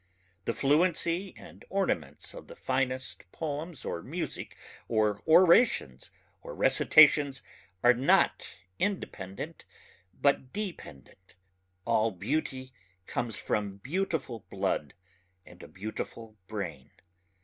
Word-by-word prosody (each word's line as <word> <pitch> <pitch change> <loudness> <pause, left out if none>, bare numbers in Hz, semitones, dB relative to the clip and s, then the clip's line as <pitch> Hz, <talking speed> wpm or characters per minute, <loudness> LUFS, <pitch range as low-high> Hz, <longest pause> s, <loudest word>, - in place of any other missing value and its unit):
The 115 - -1
fluency 170 +5 +2
and - - -13
ornaments 85 - -2
of - - -10
the - - -11
finest 130 -8 -2
poems 155 0 -5
or 85 - -3
music - - -5 0.3
or 105 -2 +1
orations 170 - +5 0.3
or - - -8
recitations 145 -3 +5 0.4
are 120 +1 +7
not 130 +3 +3 0.3
independent 100 - -4 0.6
but 140 -2 +2
dependent. 95 - -8 0.5
All 110 +1 +3
beauty 130 - -3 0.3
comes 120 -1 -3
from 100 -2 -2
beautiful 140 - -3
blood 75 -3 -2 0.5
and - - -15
a - - -10
beautiful 110 +2 -7
brain. 105 -2 -5
130 Hz, 100 wpm, -29 LUFS, 105-160 Hz, 0.6 s, are